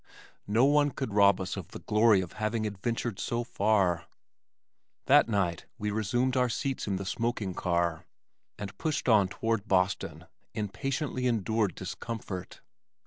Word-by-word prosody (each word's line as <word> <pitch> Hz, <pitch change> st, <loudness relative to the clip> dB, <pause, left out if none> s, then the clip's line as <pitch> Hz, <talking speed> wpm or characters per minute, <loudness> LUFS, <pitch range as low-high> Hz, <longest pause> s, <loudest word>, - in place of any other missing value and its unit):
No 110 Hz, +5 st, +4 dB
one 145 Hz, +1 st, +4 dB
could 135 Hz, -5 st, -4 dB
rob 100 Hz, -1 st, +5 dB
us 95 Hz, -1 st, -3 dB
of 95 Hz, -6 st, -6 dB
the -, -, -9 dB
glory 105 Hz, -2 st, +4 dB
of 90 Hz, -, -7 dB
having 110 Hz, +1 st, -1 dB
adventured 105 Hz, +1 st, -3 dB
so 120 Hz, 0 st, -1 dB
far. 100 Hz, -7 st, +1 dB, 1.0 s
That -, -, +5 dB
night 95 Hz, -6 st, 0 dB
we 105 Hz, 0 st, -2 dB
resumed 120 Hz, +5 st, 0 dB
our 125 Hz, -1 st, +3 dB
seats 135 Hz, +2 st, -2 dB
in 100 Hz, -, 0 dB
the 95 Hz, +1 st, -4 dB
smoking 110 Hz, -2 st, -2 dB
car, 85 Hz, -2 st, -1 dB, 0.5 s
and 100 Hz, -2 st, -6 dB
pushed 155 Hz, -4 st, -1 dB
on 105 Hz, -5 st, +5 dB
toward 110 Hz, +1 st, -2 dB
Boston 95 Hz, -1 st, 0 dB, 0.3 s
in 105 Hz, -2 st, -2 dB
patiently 130 Hz, +4 st, -2 dB
endured 110 Hz, -3 st, 0 dB
discomfort. 95 Hz, -1 st, -6 dB
105 Hz, 145 wpm, -29 LUFS, 95-120 Hz, 1.0 s, rob